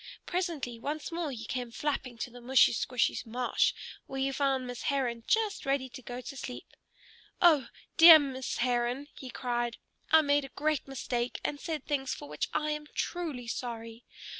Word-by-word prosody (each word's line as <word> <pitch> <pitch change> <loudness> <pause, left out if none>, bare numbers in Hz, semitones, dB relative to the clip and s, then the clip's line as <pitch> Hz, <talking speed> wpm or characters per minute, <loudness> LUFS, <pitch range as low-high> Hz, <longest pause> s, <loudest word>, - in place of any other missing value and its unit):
Presently, 330 -10 -2
once 295 +6 -4
more 335 -2 -2
he 235 -4 -6
came 245 0 -3
flapping 255 -1 -3
to 240 - -4
the 245 +1 -12
mushy 255 +1 +5
squshy 245 +2 0
marsh, 245 +1 +1 0.4
where 270 - -5
he 270 +1 +1
found 270 -1 0
Miss 245 -1 -6
Heron 250 -5 -1
just 435 -2 +1
ready 270 -1 0
to 260 +1 -10
go 245 0 -6
to 275 - -8
sleep. 250 -1 -6 0.7
"Oh, 305 -8 +5 0.3
dear 330 -1 +12
Miss 265 -3 -3
Heron!" 245 +3 0
he 260 - -9
cried. 240 -1 -2 0.3
"I 320 - +7
made 285 0 +3
a 270 - -7
great 305 0 -1
mistake, 245 -2 -2
and 290 - -2
said 310 -4 -4
things 270 -3 -1
for 145 - -9
which 150 +1 -3
I 305 0 0
am 300 0 -4
truly 315 -9 -3
sorry. 230 -1 -5
265 Hz, 175 wpm, -30 LUFS, 245-295 Hz, 0.7 s, dear